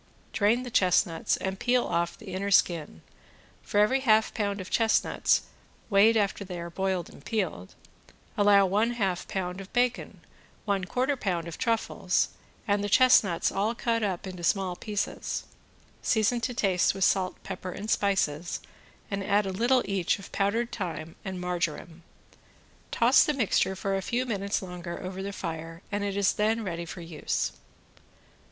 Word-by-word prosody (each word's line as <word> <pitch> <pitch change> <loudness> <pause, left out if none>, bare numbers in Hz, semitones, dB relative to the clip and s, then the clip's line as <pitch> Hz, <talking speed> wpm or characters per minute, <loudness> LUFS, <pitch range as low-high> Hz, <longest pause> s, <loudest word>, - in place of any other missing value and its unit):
Drain 225 +4 +2
the 245 - -7
chestnuts 180 -4 +2
and 190 0 -4
peel 245 0 +2
off 170 0 -1
the 200 -4 -9
inner 195 +2 -2
skin, 165 - +2 0.6
for 205 - 0
every 215 +6 +4
half 220 -4 +3
pound 200 -2 -1
of 185 - -8
chestnuts, 225 -1 +2 0.5
weighed 215 +3 +6
after 200 -1 0
they 180 -2 -6
are 170 0 -6
boiled 190 -1 -1
and - - -15
peeled, 185 - -3 0.6
allow 205 -1 +5
one 210 +5 +1
half 195 -6 -1
pound 185 0 -3
of 195 - -12
bacon, 245 0 0 0.4
one 200 -3 0
quarter 260 +8 0
pound 180 -8 -2
of 165 - -8
truffles, 230 -3 0 0.4
and 205 0 +1
the 205 - -2
chestnuts 205 -7 +5
all 215 +4 0
cut 230 0 0
up 195 -4 -2
into 180 -2 -7
small 185 0 +1
pieces; 205 +1 -3 0.6
season 225 +2 +2
to 245 +2 -2
taste 190 -4 +2
with 195 - -1
salt, 185 0 +2
pepper 185 -1 -6
and 210 +4 -5
spices 175 -5 0 0.5
and 200 0 -2
add 205 +1 +2
a 190 - -2
little 240 +6 +2
each 195 -1 0
of 195 - -12
powdered 225 +4 0
thyme 165 -5 -5
and 190 -1 -5
marjoram; 175 -1 -3 0.9
toss 240 +3 +5
the 300 - 0
mixture 200 -5 +1
for 195 +1 -2
a 195 - -1
few 240 +6 -1
minutes 200 -3 -2
longer 180 -1 -6
over 185 +1 -5
the 200 +1 -4
fire 165 -2 -6
and 205 0 -1
it 200 -1 -2
is 200 -1 +3
then 220 +2 +1
ready 170 -3 -4
for 175 - -8
use. 165 -3 -2
195 Hz, 165 wpm, -28 LUFS, 180-220 Hz, 0.9 s, weighed